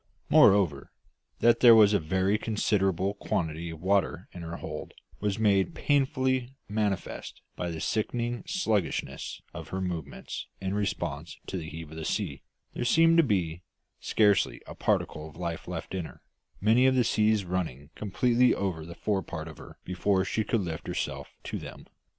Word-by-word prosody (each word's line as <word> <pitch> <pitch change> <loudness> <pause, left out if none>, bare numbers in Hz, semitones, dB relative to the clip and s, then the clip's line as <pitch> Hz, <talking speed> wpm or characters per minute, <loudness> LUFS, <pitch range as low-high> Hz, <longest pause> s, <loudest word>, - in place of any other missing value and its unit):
Moreover, 85 -9 +5 0.5
that 120 0 +5
there 120 -2 +9
was 105 -2 +7
a 100 - +4
very 95 +5 +1
considerable 100 -4 +1
quantity 85 -4 -2
of 80 0 -9
water 95 -3 +1
in 90 - -9
her 85 0 -5
hold - - -7 0.2
was 105 -1 -1
made 105 - +2
painfully 130 -3 +1
manifest 105 -2 -2
by 90 - -3
the 80 -1 -5
sickening 120 +5 -1
sluggishness 110 - -1
of - - -7
her 95 - -3
movements 85 -6 -5
in 95 0 -2
response 100 -1 -3
to - - -5
the 80 -3 -4
heave 80 -1 -8
of 80 - -9
the 80 - -5
sea; 80 -11 -2 0.3
there - - -3
seemed 165 +6 +5
to 165 - +7
be 90 - 0 0.4
scarcely 105 -3 +2
a - - -8
particle 75 +1 -1
of 75 - -16
life 85 -2 -4
left 90 0 -5
in 90 -3 -2
her, - - -13 0.4
many 115 +5 +5
of 130 - +3
the 125 - +4
seas 110 -3 +2
running 80 -6 -3
completely 120 +5 +2
over 90 -5 -2
the 85 - -8
forepart 95 -6 -2
of 80 - -10
her - - -12
before 95 +1 +1
she 110 +4 0
could 110 +1 0
lift 80 -4 -5
herself - - -3 0.2
to - - -4
them. - - -10
95 Hz, 170 wpm, -28 LUFS, 85-110 Hz, 0.5 s, there